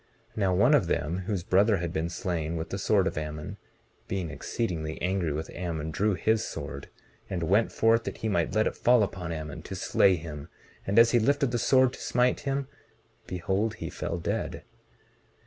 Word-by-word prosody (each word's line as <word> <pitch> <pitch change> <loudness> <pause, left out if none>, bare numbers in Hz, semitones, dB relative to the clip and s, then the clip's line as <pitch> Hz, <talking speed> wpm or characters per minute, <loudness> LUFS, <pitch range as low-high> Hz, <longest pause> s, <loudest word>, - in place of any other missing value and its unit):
19:22 - - -24
Now, 95 -3 +2
one - - +5
of - - +4
them, 80 +5 -1
whose 100 -5 -1
brother 100 +4 +3
had 85 -1 -3
been 85 -2 -1
slain 85 -4 -2
with 80 0 -4
the 95 - -3
sword 100 -1 +3
of 95 - -1
Ammon, 75 0 -6 0.5
being 90 -5 -3
exceedingly 80 -9 -3
angry 90 -3 0
with 80 +2 -4
Ammon, 80 -3 -4
drew 105 +4 +1
his 110 +3 +1
sword - - -6 0.4
and 90 -3 -2
went 100 +7 +2
forth 115 0 +3
that - - -4
he 110 - -3
might 85 -4 0
let 110 - +3
it - - -1
fall 120 -2 +4
upon 90 -4 -4
Ammon, 80 -2 -5
to - - -7
slay 95 -2 +3
him; 75 -3 -7 0.4
and 100 +3 0
as 115 0 +7
he 120 - +4
lifted 140 +2 +2
the 120 - 0
sword 130 +1 +4
to - - -10
smite 125 0 +2
him, 140 -1 -2 0.6
behold, 95 +5 -1
he - - -6
fell 85 0 -3
dead. 85 - -3
95 Hz, 195 wpm, -28 LUFS, 85-110 Hz, 0.6 s, as